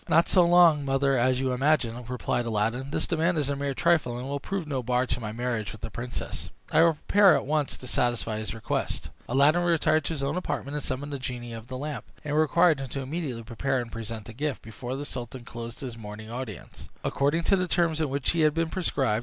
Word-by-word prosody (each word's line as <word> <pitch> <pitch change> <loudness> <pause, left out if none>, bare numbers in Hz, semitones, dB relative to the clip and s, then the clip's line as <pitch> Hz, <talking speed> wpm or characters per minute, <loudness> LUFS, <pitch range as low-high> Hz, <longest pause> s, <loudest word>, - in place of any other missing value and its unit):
"Not 165 - +5
so 180 -3 +5
long, 170 -4 +6
mother, 135 0 +2
as 130 +1 +3
you 130 -1 0
imagine," 125 -3 +1
replied 120 -1 -1
Aladdin. 115 +5 -1
"This - - -1
demand 170 +1 +1
is 145 -2 +1
a - - 0
mere 140 -1 -2
trifle, 155 -8 +2
and 125 +2 -5
will 140 +1 -2
prove 195 +4 -3
no 140 -4 -2
bar 125 +1 +1
to 125 - -1
my 110 -3 -4
marriage 115 -2 -2
with 110 - -11
the 115 - -5
princess. 125 +1 -5 0.2
I - - +5
will 165 -1 +5
prepare 195 +2 +5
at - - -1
once 150 0 0
to - - -11
satisfy 120 -3 0
his 110 +1 -4
request." 110 - -2 0.2
Aladdin 140 +7 +4
retired 160 -2 +3
to - - -1
his 140 -3 -3
own 140 - 0
apartment 145 -5 -3
and 150 - -3
summoned 145 +2 -3
the 140 - -3
genie 125 -2 -5
of 115 0 -8
the 130 - -5
lamp, 140 -4 -4 0.2
and 150 0 -1
required 155 0 +4
him 135 - -4
to 135 +3 -4
immediately 135 -4 -4
prepare 130 +4 -1
and 120 -1 -5
present 115 -1 -6
the 115 - -9
gift, 145 +4 -3
before 120 +3 -6
the 145 +2 -4
sultan 125 -2 -6
closed 115 -1 -7
his 125 -4 -5
morning 110 0 -8
audience, 120 -5 -7
according 145 +5 +1
to 195 - +4
the 185 -1 0
terms 165 -2 +1
in 155 - +1
which 140 +1 0
it 170 - +1
had 155 -1 +4
been 165 0 +1
prescribed. 135 - 0
135 Hz, 235 wpm, -27 LUFS, 120-155 Hz, 0.2 s, long